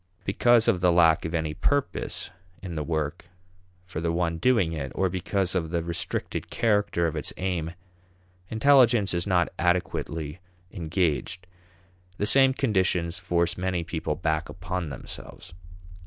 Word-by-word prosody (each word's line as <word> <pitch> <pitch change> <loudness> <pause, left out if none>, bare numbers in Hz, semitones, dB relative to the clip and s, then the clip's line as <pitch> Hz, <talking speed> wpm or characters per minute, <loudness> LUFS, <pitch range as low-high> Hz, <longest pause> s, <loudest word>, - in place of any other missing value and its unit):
Because 120 +4 +4
of 110 -6 +3
the 90 -1 +4
lack 85 -1 +4
of 80 +1 -3
any 80 -2 -1
purpose 145 - -1 0.3
in 90 -3 -5
the 75 -2 -2
work 80 +2 -3 0.6
for 90 -3 -5
the 85 0 0
one 85 -1 -1
doing 105 -6 +2
it, 70 -5 -4
or 95 -1 +1
because 95 +1 -1
of 85 -4 -1
the 85 0 -1
restricted 85 0 -3
character 105 -6 +1
of 80 - -1
its - - -2
aim, 90 -3 -2 0.7
intelligence 120 -4 +4
is 85 +3 -1
not 90 -3 +2
adequately 85 -2 -1 0.3
engaged. 90 0 -1 0.7
The 105 - 0
same 135 +4 +6
conditions 90 -8 +1
force 85 -1 0
many 90 -2 -1
people 80 -2 -3
back 80 -2 -1
upon 90 -1 -4
themselves. 70 +4 -9
90 Hz, 140 wpm, -26 LUFS, 80-95 Hz, 0.7 s, same